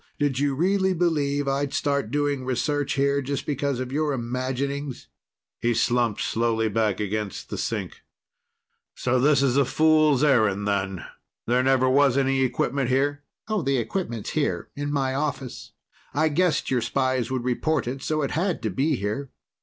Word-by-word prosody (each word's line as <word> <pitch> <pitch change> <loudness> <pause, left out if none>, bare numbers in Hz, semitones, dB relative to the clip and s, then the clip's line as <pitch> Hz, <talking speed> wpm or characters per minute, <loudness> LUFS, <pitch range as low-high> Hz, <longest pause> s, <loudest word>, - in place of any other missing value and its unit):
Did 145 -3 0
you 140 -1 +1
really 190 +4 +2
believe 145 -5 0
I'd 140 +1 -1
start 140 -6 0
doing 145 0 0
research 145 +3 -1
here 140 0 +1
just 140 +1 -3
because 140 -2 -1
of 130 0 -4
your 150 +1 0
imaginings?" 130 +3 -3 0.5
He 120 0 +1
slumped 120 -2 +1
slowly 115 -1 0
back 110 -1 0
against 105 -1 -3
the - - -3
sink. - - -3 0.9
"So 125 0 +1
this 140 +1 +4
is 135 -1 +2
a 140 - +5
fool's 155 0 +3
errand, 110 -8 +3
then? 95 -2 -1 0.4
There 125 +2 +2
never 130 0 +3
was 135 0 +4
any 135 -1 +2
equipment 130 0 0
here?" 145 +2 +1 0.3
"The 160 -11 0
equipment's 120 - -3
here - - -1
in 145 0 -3
my 135 -2 0
office. 135 -3 -4 0.4
I 155 +2 +3
guessed 160 -1 +1
your 125 -2 +2
spies 130 +2 0
would 130 -2 -2
report 135 +5 0
it, 130 +2 -4
so 155 +1 -1
it 140 - -2
had 170 -3 -1
to 110 - -1
be 140 - +1
here. 110 +6 -3
135 Hz, 160 wpm, -25 LUFS, 125-145 Hz, 0.9 s, a